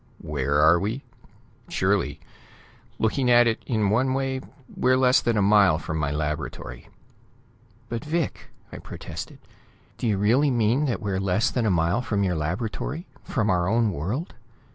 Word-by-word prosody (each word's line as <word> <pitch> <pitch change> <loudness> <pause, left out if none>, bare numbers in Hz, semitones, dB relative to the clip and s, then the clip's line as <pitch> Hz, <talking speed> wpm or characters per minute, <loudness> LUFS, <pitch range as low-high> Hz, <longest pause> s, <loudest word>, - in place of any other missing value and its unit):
"Where 75 +3 +2
we 105 +6 -1
are? 135 - -19
Surely. - - 0 0.8
Looking 125 +3 +1
at 120 0 +6
it 115 -1 0
in 110 -5 +1
one 130 +4 +2
way, 135 -1 -1 0.3
we're 130 0 +3
less 130 -1 +4
than 115 -2 0
a 105 - +3
mile 100 -5 +5
from 80 -1 -4
my 75 -2 0
laboratory." 75 +1 -4 1.0
"But, 115 +2 -4
Vic!" 160 0 -3 0.2
I - - -8
protested. - - -8 0.6
"Do - - -1
you 105 -3 +1
really 120 +9 +3
mean 120 +3 +2
that 125 -5 -2
we're 95 -2 -1
less 95 +5 +1
than 120 -3 0
a - - +3
mile 85 +5 +1
from 105 -4 -1
your 90 -2 +1
laboratory; 105 - -3 0.2
from 110 -3 0
our 90 -1 +1
own 115 -1 +2
world? 100 - -4
110 Hz, 160 wpm, -25 LUFS, 90-125 Hz, 1.0 s, at